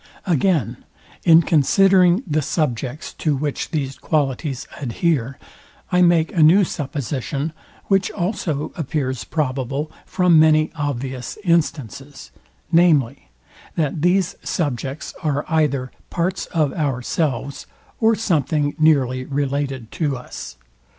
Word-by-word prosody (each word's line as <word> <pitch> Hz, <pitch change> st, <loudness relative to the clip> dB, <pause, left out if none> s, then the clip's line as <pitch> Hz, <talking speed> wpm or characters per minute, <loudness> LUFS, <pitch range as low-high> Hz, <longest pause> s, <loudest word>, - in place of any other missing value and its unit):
Again, 170 Hz, -, +1 dB, 0.5 s
in 165 Hz, 0 st, +7 dB
considering 185 Hz, -, +4 dB
the 155 Hz, -3 st, 0 dB
subjects, 135 Hz, -2 st, -2 dB
to 150 Hz, -3 st, +1 dB
which 145 Hz, +1 st, -3 dB
these 135 Hz, -4 st, -3 dB
qualities 140 Hz, -2 st, -1 dB
adhere, 135 Hz, 0 st, -1 dB, 0.5 s
I 180 Hz, 0 st, +3 dB
make 170 Hz, -2 st, +3 dB
a 165 Hz, -, +3 dB
new 170 Hz, +6 st, +6 dB
supposition, 145 Hz, -, -3 dB, 0.3 s
which 195 Hz, -1 st, +2 dB
also 170 Hz, -6 st, -2 dB
appears 130 Hz, -, -2 dB
probable 140 Hz, -, -2 dB, 0.2 s
from 180 Hz, -3 st, +4 dB
many 155 Hz, 0 st, +4 dB
obvious 135 Hz, -4 st, -4 dB
instances, 145 Hz, -, -1 dB, 0.4 s
viz, 170 Hz, -3 st, +6 dB, 0.8 s
that 155 Hz, -1 st, -1 dB
these 180 Hz, +1 st, +2 dB
subjects 140 Hz, -2 st, -3 dB
are 150 Hz, -2 st, -1 dB
either 140 Hz, -5 st, 0 dB, 0.2 s
parts 180 Hz, +2 st, -2 dB
of 155 Hz, -5 st, 0 dB
ourselves, 140 Hz, -1 st, -2 dB, 0.3 s
or 225 Hz, 0 st, +4 dB
something 155 Hz, -, 0 dB
nearly 130 Hz, -5 st, +3 dB
related 140 Hz, -3 st, -2 dB
to 145 Hz, -5 st, -1 dB
us. 65 Hz, -, -9 dB
150 Hz, 110 wpm, -21 LUFS, 135-170 Hz, 0.8 s, in